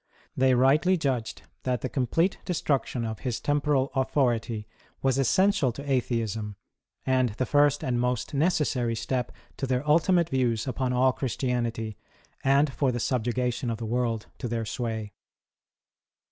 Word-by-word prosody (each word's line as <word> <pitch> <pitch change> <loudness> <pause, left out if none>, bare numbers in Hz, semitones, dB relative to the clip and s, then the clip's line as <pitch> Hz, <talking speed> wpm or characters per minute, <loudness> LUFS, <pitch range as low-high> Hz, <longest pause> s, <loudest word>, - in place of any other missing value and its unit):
They 130 0 +4
rightly 150 +9 +4
judged 130 -8 -2 0.2
that 125 -2 -1
the - - -1
complete 150 +9 0
destruc 150 -6 0
tion 120 -2 -3
of 110 -1 -4
his 125 -3 -3
temporal 145 -2 +1
authority 120 -5 0 0.4
was 135 0 +2
essential 170 - +3
to 140 +4 -8
Atheism, 115 -5 -1 0.5
and 130 -1 +2
the 130 +4 -1
first 145 0 +3
and 120 -2 0
most 125 +3 -1
necessary 140 -6 +1
step 125 +2 -2 0.3
to 135 - -2
their 130 +3 -1
ultimate 170 +2 +3
views 120 -6 +1
upon 130 0 -1
all 130 +1 +3
Christianity, 120 -4 -2 0.5
and 140 +1 +3
for 135 -1 +1
the 120 - -3
subjugation 125 0 -1
of 115 - -2
the 115 - -5
world 115 -1 -1
to - - -3
their 115 -1 -2
sway. 110 -2 -4
130 Hz, 145 wpm, -27 LUFS, 115-140 Hz, 0.5 s, They